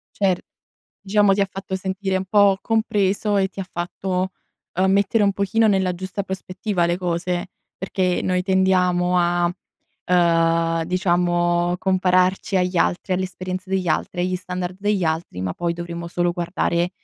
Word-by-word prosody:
Cer 190 -3 +1 0.6
diciamo 205 0 +3
ti 200 - +1
ha 195 - +2
fatto 195 +1 -6
sentire 190 0 -2
un 190 - -2
po' 200 -1 +4
compreso 210 -2 +1
e 190 0 +2
ti 195 0 -6
fatto, 185 +1 -3 0.4
ehm, 190 +1 +2
mettere 200 +3 +2
un 200 - +3
pochino 200 +3 +1
nella 190 -3 +2
giusta 190 +2 -4
prospettiva 190 -1 -2
le 175 +1 0
cose, 175 0 -2 0.3
perché 185 -1 0
noi 180 0 0
tendiamo 180 -1 +2
a, 175 0 +2 0.5
ehm, 165 -1 +2
diciamo 175 -1 +1
compararci 185 0 +2
agli 180 0 0
altri, 185 +2 +1
alle 190 - 0
esperienze 185 +1 -6
degli 185 -3 0
altri, 175 +3 -1
agli 185 +1 0
standard 180 0 -5
degli 205 -3 0
altri, 160 - -2
ma 90 -1 -2
poi 170 -1 -1
dovremmo 170 0 -6
solo 175 0 0
guardare 175 0 -1
185 Hz, 150 wpm, -22 LUFS, 175-190 Hz, 0.6 s, po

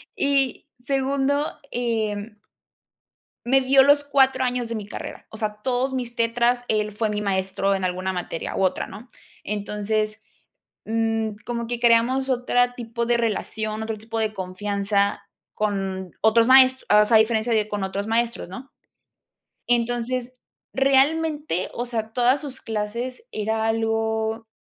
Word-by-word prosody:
y 275 -2 0 0.2
segundo, 275 +1 0
eh 220 -3 -2 1.1
me 265 +2 +4
dio 265 +1 +6
los 285 +1 +5
4 270 -2 +3
años 250 -1 -1
de 230 - -3
mi 210 -2 -5
carrera, - - -8
o 220 - -10
sea, 210 -1 -3
todos 260 +1 0
mis 245 -2 -4
tetras, 240 +1 +1
él 215 -1 0
fue 215 +1 -1
mi 210 0 -2
maestro 195 0 0
en 190 - -3
alguna 185 +1 -1
materia 175 -2 -4
u - - 0
otra, 185 -1 0
¿no?, 240 +4 -11 0.3
entonces, 210 +1 -2 0.7
mm, 225 0 0 0.2
como 235 -1 -3
que 240 0 -4
creamos 240 +3 +3
otra 245 -1 +1
tipo 235 -1 -4
de 240 0 +3
relación, 215 -1 -2
otro 220 0 -3
tipo 225 +2 -6
de 220 -1 0
confianza 200 +2 -1 0.3
con 195 -3 -2
otros 230 +1 +4
maestros, 260 0 +6 0.2
o - - +4
sea, 225 - +5
a - - +8
diferencia 220 +1 +1
de 215 -1 +1
con 205 -1 -3
otros 195 +1 -3
maestros, 230 -2 -1
¿no? 245 +9 -9 1.0
entonces, 245 +1 0 0.4
realmente, 280 - +2
o 240 - -3
sea, 225 -2 -4
todas 250 +3 +3
sus 275 -3 -8
clases 230 - -4
era 220 +1 -1
algo 225 0 -1
225 Hz, 145 wpm, -23 LUFS, 210-250 Hz, 1.1 s, a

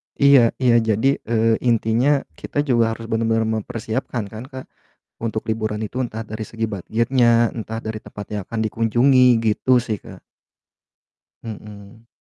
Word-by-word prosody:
Iya 140 -1 +6 0.2
iya, 120 -2 +5
jadi, 110 +3 +1 0.2
eee, 115 -1 +2
intinya, 120 +5 +2 0.2
kita 145 - -2
juga 115 -5 +2
harus 115 - -9
benar-benar 115 0 +1 0.2
mempersiapkan, 115 +1 -4
kan, 110 +2 -7
Kak, 130 -1 -9 0.6
untuk 110 -1 -3
liburan 110 -1 -2
itu 125 +4 -5
entah 115 -1 -5
dari 110 +1 -5
segi 115 +1 -6
budget-nya 115 +3 +2
entah 115 -1 -5
dari 110 -1 -5
tempat 105 - -9
yang 100 - -2
akan 115 - -5
dikunjungi, 120 +4 +3
gitu, 115 +3 +2
sih, 110 -3 -3
Kak. - - -12 1.2
Mhm. 105 +1 -10
115 Hz, 145 wpm, -21 LUFS, 110-120 Hz, 1.2 s, Iya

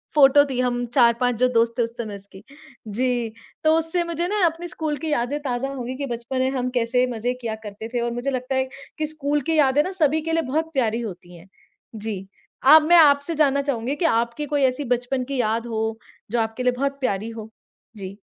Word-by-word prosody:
Photo 285 0 +7
थी 255 -2 -2
हम 245 -1 0
4-5 245 -1 +3
जो 255 - +4
दोस्त 230 0 +3
थे, - - +2
उस 230 - -3
समय 220 -4 -5
उसकी। 195 -1 -12 0.5
जी, 240 +2 0 0.3
तो 315 - +4
उससे 325 +2 0
मुझे 340 0 -2
ना 420 +3 -1
अपनी 335 +1 -1
स्कूल 315 -3 -3
की 320 - -4
यादें 275 +2 0
ताज़ा 265 -1 -2
हो 260 -3 -5
गई 250 +2 -5
कि 280 - -3
बचपन 240 +1 -4
में 260 0 +2
हम 255 -2 -1
कैसे 245 +2 +2
मज़े 240 +1 -2
किया 225 -2 -3
करते 210 +1 -7
थे 245 - 0
और 235 0 -1
मुझे 245 +3 -2
लगता 255 0 -2
है 265 0 +1 0.3
कि 310 - -1
स्कूल 295 -1 -1
की - - +2
यादें 285 -1 +4
ना 370 - -4
सभी 310 +1 +3
के 325 +1 -3
लिए 330 - +2
बहुत 320 +4 -1
प्यारी 235 -4 0
होती 180 -5 -8
हैं। 170 +2 -15 0.5
जी, 205 -3 -5 0.4
अब 305 +4 +9
मैं 345 - +8
आपसे 290 0 +5
जानना 280 -2 +3
चाहूँगी 275 -1 -2
कि 335 - -1
आपकी 235 +5 -2
कोई 290 0 -1
ऐसी 255 +3 -5
बचपन 250 +2 -3
की 275 +2 -4
याद 225 +1 -1
हो, 220 -1 -2 0.3
जो 240 - +1
आपके 225 +2 -2
लिए 250 - +3
बहुत 275 +2 -2
प्यारी 215 -3 -1
हो? 220 -1 -8 0.5
जी। 195 0 -8
255 Hz, 225 wpm, -23 LUFS, 230-290 Hz, 0.5 s, अब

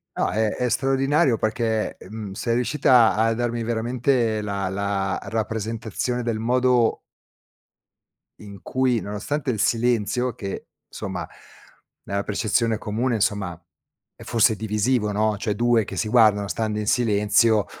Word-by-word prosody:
No, - - 0
è 110 0 +1
è 125 +3 -1
straordinario 135 0 +2
perché, 110 -1 -1
mhmm, 105 0 -7
sei 115 +3 -1
riuscita 125 -2 +4
a 115 +1 +2
darmi 120 0 -2
veramente 120 0 0
la 100 -2 -2
la 95 0 -2
rappresentazione 110 +2 -3
del 115 -2 -2
modo 125 0 +2 1.4
in 100 -2 -11
cui, 130 -3 0
nonostante 110 +9 -3
il 110 - -2
silenzio 120 +1 +1
che, 100 -5 -6 0.2
insomma, - - -5 0.8
nella 100 0 -2
percezione 110 +1 0
comune, 115 +3 -1
insomma, 95 -5 -1 0.5
è - - -15
forse 115 -1 +3
divisivo, 105 +1 0
no, 105 0 +1
cioè 105 0 -2
2 120 0 +2
che - - -8
si 110 - -1
guardano 105 -3 +4
stando 110 -1 -2
in 105 - -3
silenzio, 110 -1 +3
110 Hz, 130 wpm, -23 LUFS, 105-120 Hz, 1.4 s, riuscita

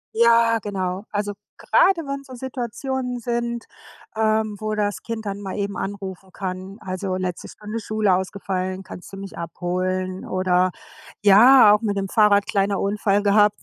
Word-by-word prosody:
Ja, 230 0 +5
genau. 190 -1 -3
Also, 205 0 -2 0.2
gerade 390 -9 +3
wenn's 275 0 -5
so 255 - -9
Situationen 250 0 -4
sind, 235 0 -2 0.5
ähm, 220 -1 +1
wo 215 0 -2
das 205 -1 -1
Kind 225 -1 -5
dann 200 0 -4
mal 195 -2 -5
eben 200 -1 -2
anrufen 195 -1 -6
kann, 190 +1 -6
also, 185 0 -3
letzte 185 -2 -4
Stunde 215 +2 -6
Schule 215 -3 +1
ausgefallen, 190 0 -2
kannst 180 0 -11
du 195 - -8
mich 195 0 -8
abholen? 185 +2 -3
Oder 185 0 +1 0.5
ja, 215 +2 +8
auch 210 - +2
mit 205 -3 -1
dem 195 -1 -2
Fahrrad 205 -2 +4
kleiner 200 0 0
Unfall 205 0 +1
gehabt 210 0 +4
205 Hz, 155 wpm, -22 LUFS, 190-225 Hz, 0.5 s, ja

